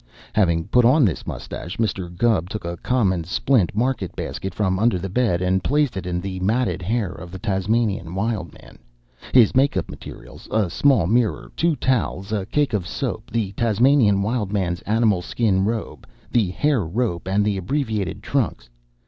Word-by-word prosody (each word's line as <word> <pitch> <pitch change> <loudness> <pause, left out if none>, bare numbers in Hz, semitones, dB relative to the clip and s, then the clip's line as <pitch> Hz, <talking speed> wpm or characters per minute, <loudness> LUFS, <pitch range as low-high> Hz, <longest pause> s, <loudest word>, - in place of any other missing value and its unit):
Having 85 -6 +1
put 125 - +4
on 130 +4 +5
this 90 - -2
mustache, 85 - -6
Mr. 100 -5 -1
Gubb 100 -6 +2
took 105 -4 -5
a 85 0 -3
common 95 -6 +1
splint 100 +3 +1
market 115 -6 -1
basket 95 - -4
from 95 -3 0
under 115 -2 +3
the 95 +2 -5
bed 95 -4 +1
and 95 +1 +1
placed 145 -4 +1
in 95 -2 -4
it - - -3
the 95 -1 -4
matted 110 +4 0
hair 105 +1 -1
of 90 -1 -9
the 95 - -7
Tasmanian 95 -1 -1
Wild 100 -3 -2
Man, - - -16 0.5
his 120 -5 +6
make 135 +2 +3
up - - -3
materials, - - -11
a 105 -5 0
small 130 -5 +3
mirror, 115 +3 0
two 170 -1 +2
towels, 115 -6 -1
a 100 -3 -2
cake 145 -1 0
of 95 -4 -1
soap, - - -4
the 110 -3 -1
Tasmanian 115 -1 +3
Wild 105 -2 -1
Man's 90 -4 -1
animal 110 -4 +3
skin 95 -1 +1
robe, 110 0 -4 0.2
the 110 -6 +2
hair 135 +3 +1
rope, 90 0 -2
and 100 +2 +2
the 105 -2 0
abbreviated 110 - -2
trunks. - - -2
105 Hz, 175 wpm, -22 LUFS, 95-120 Hz, 0.5 s, his